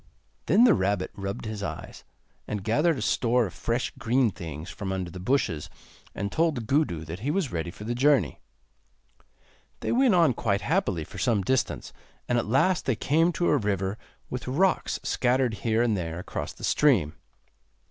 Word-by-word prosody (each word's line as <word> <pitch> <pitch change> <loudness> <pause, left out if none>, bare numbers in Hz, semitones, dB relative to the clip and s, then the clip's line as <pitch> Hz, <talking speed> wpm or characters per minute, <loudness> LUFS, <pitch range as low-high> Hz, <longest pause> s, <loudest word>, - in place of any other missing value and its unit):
Then 220 +5 +5
the 240 -4 +7
rabbit 95 0 0
rubbed 100 +2 -5
his 110 -2 -5
eyes, - - -6 0.4
and 105 -2 -3
gathered 150 - +2
a 115 - -3
store 120 +1 +2
of 90 - -7
fresh 120 +2 -2
green 120 0 +2
things 80 -1 -7
from 100 -2 -5
under 95 -2 -3
the 90 - -8
bushes, 90 - 0 0.5
and 100 0 -3
told 155 -8 0
Gudu 115 - 0
that 80 +4 -6
he 125 +7 -3
was 160 -3 0
ready 85 0 -3
for 105 - -10
the 115 +3 -2
journey. 135 +1 +2 1.4
They - - -1
went 250 -4 +4
on 165 -7 +5
quite 100 -3 0
happily 145 - 0
for - - -10
some 110 -6 +1
distance, 130 +6 -1 0.3
and 120 -1 +2
at 115 - -3
last 145 - +2
they 130 - +2
came 160 +9 +2
to 175 +2 +1
a 145 - +4
river 100 -4 -1 0.3
with 125 0 -6
rocks 180 +9 +1
scattered 125 -1 +1
here 115 0 +2
and 115 -3 +2
there 85 -3 -3
across 90 - -5
the - - -14
stream. 105 - +3
115 Hz, 180 wpm, -27 LUFS, 95-140 Hz, 1.4 s, the